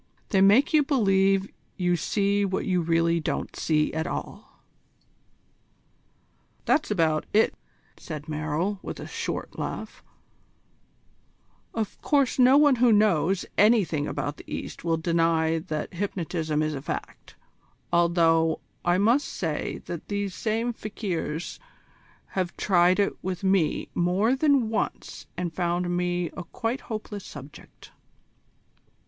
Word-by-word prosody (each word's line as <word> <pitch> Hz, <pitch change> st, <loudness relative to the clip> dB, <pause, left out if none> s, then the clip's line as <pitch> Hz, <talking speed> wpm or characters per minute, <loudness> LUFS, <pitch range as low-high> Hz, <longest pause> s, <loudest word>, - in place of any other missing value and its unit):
They 195 Hz, -3 st, +3 dB
make 215 Hz, +11 st, +5 dB
you 305 Hz, -, +6 dB
believe 195 Hz, -8 st, +2 dB, 0.3 s
you 180 Hz, -2 st, +2 dB
see 200 Hz, +4 st, +1 dB
what 190 Hz, -1 st, -1 dB
you 180 Hz, -2 st, +1 dB
really 165 Hz, 0 st, +2 dB
don't 155 Hz, -, -3 dB
see 150 Hz, -1 st, +1 dB
at 160 Hz, +1 st, -2 dB
all." -, -, -7 dB, 2.0 s
"That's 305 Hz, -, +2 dB
about 160 Hz, -6 st, +1 dB
it," 220 Hz, +2 st, +4 dB, 0.4 s
said 150 Hz, -2 st, -7 dB
Merrill, 160 Hz, +6 st, -2 dB
with -, -, -7 dB
a -, -, -6 dB
short -, -, -5 dB
laugh, -, -, -5 dB, 1.7 s
"Of 220 Hz, -3 st, -3 dB
course 280 Hz, -4 st, +2 dB
no 255 Hz, +2 st, +7 dB
one 290 Hz, -3 st, +5 dB
who 240 Hz, 0 st, +5 dB
knows 195 Hz, -4 st, +3 dB
anything 190 Hz, -9 st, +3 dB
about 145 Hz, 0 st, -3 dB
the -, -, -13 dB
East -, -, -6 dB
will 165 Hz, -1 st, +1 dB
deny 165 Hz, -1 st, +1 dB
that 155 Hz, -1 st, -5 dB
hypnotism 170 Hz, -5 st, -2 dB
is 155 Hz, 0 st, -1 dB
a 135 Hz, -, -5 dB
fact, 140 Hz, -, -6 dB, 0.6 s
although 165 Hz, -1 st, +3 dB, 0.2 s
I 175 Hz, +1 st, +3 dB
must 235 Hz, +9 st, +3 dB
say 160 Hz, -4 st, -3 dB
that 170 Hz, -, -6 dB
these 200 Hz, -2 st, -2 dB
same 225 Hz, +4 st, -1 dB
fakirs 180 Hz, -7 st, -4 dB, 0.7 s
have 185 Hz, -2 st, -3 dB
tried 180 Hz, -1 st, +4 dB
it 200 Hz, -, +2 dB
with 185 Hz, 0 st, -4 dB
me 190 Hz, -5 st, +1 dB
more 190 Hz, +8 st, +2 dB
than 275 Hz, -5 st, +3 dB
once 225 Hz, -, -3 dB
and 175 Hz, -2 st, -3 dB
found 175 Hz, +1 st, -1 dB
me 175 Hz, -1 st, -1 dB
a 180 Hz, -, -5 dB
quite 225 Hz, +9 st, -3 dB
hopeless 215 Hz, -3 st, -6 dB
subject." 145 Hz, 0 st, -12 dB
180 Hz, 130 wpm, -26 LUFS, 165-210 Hz, 2.0 s, no